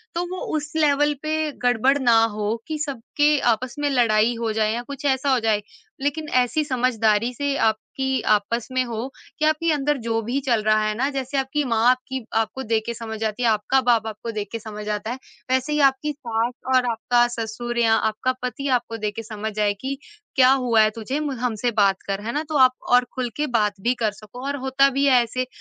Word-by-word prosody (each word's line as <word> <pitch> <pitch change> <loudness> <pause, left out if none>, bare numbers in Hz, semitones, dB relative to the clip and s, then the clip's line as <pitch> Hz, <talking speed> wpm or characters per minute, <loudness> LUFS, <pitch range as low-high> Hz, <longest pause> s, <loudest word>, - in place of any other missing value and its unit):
तो 345 +1 -1
वो - - -5 0.2
उस 295 0 -6
लेवल 295 -1 +3
पे 310 0 -1
गड़बड़ 245 +3 +3
ना 235 -4 +5
हो 210 +1 -1
कि 315 -1 -3
सबके 290 +3 +1 0.2
आपस 245 +2 -6
में 290 0 +1
लड़ाई 235 -3 +3
हो 230 -1 -1
जाए 215 0 +1
या 235 - -2
कुछ 280 +2 -8
ऐसा 270 0 +1
हो 255 - +3
जाए। 220 -2 +1 0.4
लेकिन 290 +2 -2
ऐसी 250 +5 +1
समझदारी 240 -4 +1
से 285 +2 -1
आपकी 265 +4 0
आपस 215 +3 -1
में 255 0 +1
हो 235 +1 -4 0.3
कि 305 - +2
आपके 310 +2 +2
अंदर 295 0 0
जो 225 0 0
भी 240 +5 -2
चल 235 -4 +3
रहा 215 0 +3
है 215 - 0
ना, 265 +5 0
जैसे 275 0 -3
आपकी 270 +2 0
माँ 240 0 +3
की 265 -3 -5
आपको 225 +4 -1
देख 225 -1 0
के 235 - -3
समझ 225 -1 -6
आती 220 +2 -2
है, 235 - +4
आपका 220 +5 +2
बाप 235 -3 +2
आपको 220 +1 -6
देख 210 -2 -4
के 230 - -4
समझ 210 -1 -8
आता 210 +2 -2
है, 250 - -4 0.3
वैसे 260 +3 +1
ही 300 - +1
आपकी 270 +3 -2
सास 235 -3 -2 0.2
और 255 -1 +4
आपका 240 +2 +2
ससुर 235 +2 -4
या 225 -1 +4
आपका 220 +4 0
पति 255 +3 -3
आपको 230 -1 -7
देख 210 -1 -3
के 225 - -5
समझ 220 0 -5
जाए 210 -1 +1
कि 275 +1 -3 0.4
क्या 255 -1 +6
हुआ 250 -4 +3
है 215 - +4
तुझे, 245 +6 -3
म 300 -2 -2
हमसे 240 -1 -1
बात 195 -1 +3
कर, 195 0 -2
है 225 +3 -4
ना? 300 - -1
तो 305 - 0
आप 255 -1 +6 0.2
और 245 0 +5
खुल 255 -2 -2
के 300 0 0
बात 210 -2 0
भी 240 +5 +2
कर 215 - +2
सको 215 +5 -11
और 285 - -1
होता 275 +1 +4
भी 275 +1 0
है 255 -3 +5
ऐसे 255 +2 -3
245 Hz, 225 wpm, -23 LUFS, 220-270 Hz, 0.4 s, क्या